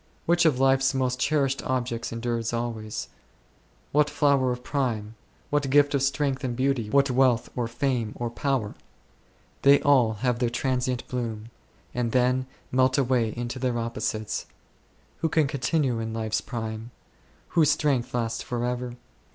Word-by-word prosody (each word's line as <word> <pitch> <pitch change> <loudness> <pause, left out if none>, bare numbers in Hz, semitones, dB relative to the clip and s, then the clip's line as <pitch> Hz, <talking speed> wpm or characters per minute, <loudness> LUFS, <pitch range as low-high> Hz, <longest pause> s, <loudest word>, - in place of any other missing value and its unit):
Which 170 0 +3
of 145 -6 +3
life's 135 0 +3
most 130 -1 0
cherished 140 -1 +1
objects 120 -2 -2
endures 115 0 -2
always? 110 - -3 0.8
What 150 0 +3
flower 140 -3 +2
of 125 0 -5
prime? 115 -7 -2 0.4
What 145 -2 +1
gift 145 +1 +4
of 140 - +2
strength 135 0 0
and 125 -2 -2
beauty? 130 -4 0
What 140 +3 +3
wealth, 125 -2 +2
or 120 -2 -1
fame, 120 -2 -1
or 120 -1 -3
power? 125 -4 -1 0.9
They 140 +1 +7
all 130 -7 +4
have 125 -2 +1
their 120 -2 +1
transient 125 0 -1
bloom, 115 -3 -4 0.4
and 120 -2 -1
then 125 0 +2 0.2
melt 130 +1 +3
away 125 -4 +2
into 120 +2 -4
their 125 -2 0
opposites. 110 -2 -3 0.7
Who 160 - 0
can 155 -2 +3
continue 135 -2 0
in 110 0 -4
life's 110 -1 -1
prime? 110 -1 -5 0.6
Whose 160 -3 +4
strength 140 -5 +1
lasts 115 -1 -1
for 120 -1 -3
ever? 125 0 -3
125 Hz, 150 wpm, -26 LUFS, 115-135 Hz, 0.9 s, They